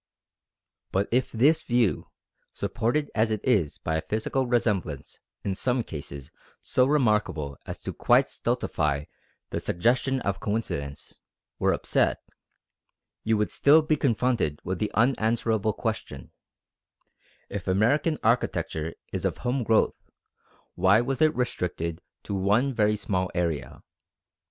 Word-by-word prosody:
But 100 +1 +1
if 125 +2 +1
this 145 +8 +4
view, 120 -5 +1 0.4
supported 120 +6 -1
as 110 +1 +2
it 110 -1 -1
is 100 - +2
by 80 0 -2
a - - -1
physical 115 +7 -1
resemblance 105 - -1 0.2
in 100 - -1
some 125 +5 0
cases 70 - -8 0.3
so 125 0 +2
remarkable 105 - +1
as - - -7
to - - -4
quite - - +3
stultify 75 -1 -1 0.5
the - - -1
suggestion 125 +8 +1
of 100 -1 -2
coincidence, 75 -10 -4 0.4
were - - +3
upset, - - +1 1.1
you 110 0 +2
would 105 - 0
still 155 +3 +5
be 155 0 +2
confronted 120 - 0
with 95 -1 -3
the 105 - 0
unanswerable 110 -2 +2
question: - - -4 1.2
If 100 -2 -6
American 140 - +2
architecture 80 -8 0 0.2
is - - -2
of - - -1
home 125 +1 +1
growth, 110 0 +2 0.7
why 95 +5 +4
was 135 +4 -2
it 155 0 +4
restricted 90 -9 -2 0.2
to - - -5
one 105 +8 +2
very 105 -2 +2
small 95 -3 -1
area? 85 -4 -2
110 Hz, 125 wpm, -26 LUFS, 90-125 Hz, 1.2 s, still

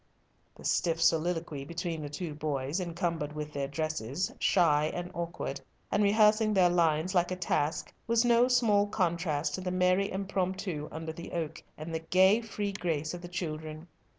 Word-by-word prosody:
The - - -13
stiff 165 -2 +1
colloquy 165 -3 -1
between 170 +1 -4
the 145 - -5
two 155 +2 -5
boys, 145 +1 -2
encumbered 170 -4 -2
with 150 0 -5
their 140 -1 -2
dresses, 155 +1 -2
shy 155 -5 +4
and 175 0 -4
awkward, 165 -5 -4 0.3
and 205 - +2
rehearsing 215 +1 +4
their 180 -2 +5
lines 165 +1 +2
like 175 -1 +2
a 185 - -2
task, 160 -3 -1
was 230 +1 +3
no 240 +1 +5
small 220 -5 +3
contrast 170 -6 0
to 185 - -3
the 185 - -2
merry 185 +2 +2
impromptu 190 -4 -2
under 160 0 -5
the 170 +1 -9
oak, 160 -2 -3 0.2
and 155 +2 -6
the 160 - -1
gay, 190 +6 +4
free 205 -2 -3
grace 160 -5 -2
of 175 - -6
the 175 - -7
children. 155 -2 -5
170 Hz, 170 wpm, -30 LUFS, 155-190 Hz, 0.3 s, their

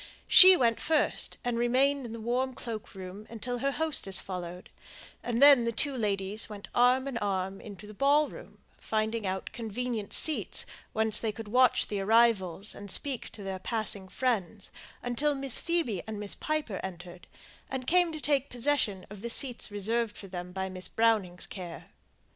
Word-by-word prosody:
She 375 -1 +9
went 230 -3 +2
first, 310 -2 0
and 240 -1 -1
remained 260 +2 +2
in - - -9
the 230 - -6
warm 250 +3 -1
cloak 225 -4 -7
room 190 +3 -9
until 245 +2 -5
her 275 +3 0
hostess 275 - +1
followed; 180 -1 -7 0.5
and 240 +2 +1
then 280 -4 +8
the 235 - 0
two 275 +4 0
ladies 205 -2 -1
went 205 -1 -9
arm 250 +2 +4
in 255 -4 -3
arm 195 -1 -2
into 205 -1 -10
the 210 - -11
ball 285 +6 +3
room, - - -12 0.2
finding 220 -1 -1
out 190 0 -3
convenient 230 -1 -4
seats 315 - +2 0.3
whence 220 -1 +1
they 225 - -1
could 220 +1 -9
watch 250 +2 +4
the 205 - -3
arrivals 210 -3 +2
and 205 0 -9
speak 270 +5 0
to 210 - -9
their 190 -1 -4
passing 215 -2 -2
friends, 210 -2 -2 0.3
until 280 +5 0
Miss 270 -2 -2
Phoebe 320 - -1
and 215 -1 -5
Miss 205 -1 -3
Piper 305 -11 -3
entered, 175 -1 -9 0.4
and 260 -1 -4
came 355 +3 +3
to 310 - -6
take 285 -2 0
possession 245 -7 +1
of 205 -2 -9
the 235 - -4
seats 245 0 -1
reserved 215 +2 -1
for - - -8
them 180 -1 -7
by 190 +1 -3
Miss 185 -1 -2
Browning's 215 -6 +1
care. 175 -3 -9
225 Hz, 175 wpm, -29 LUFS, 195-255 Hz, 0.5 s, She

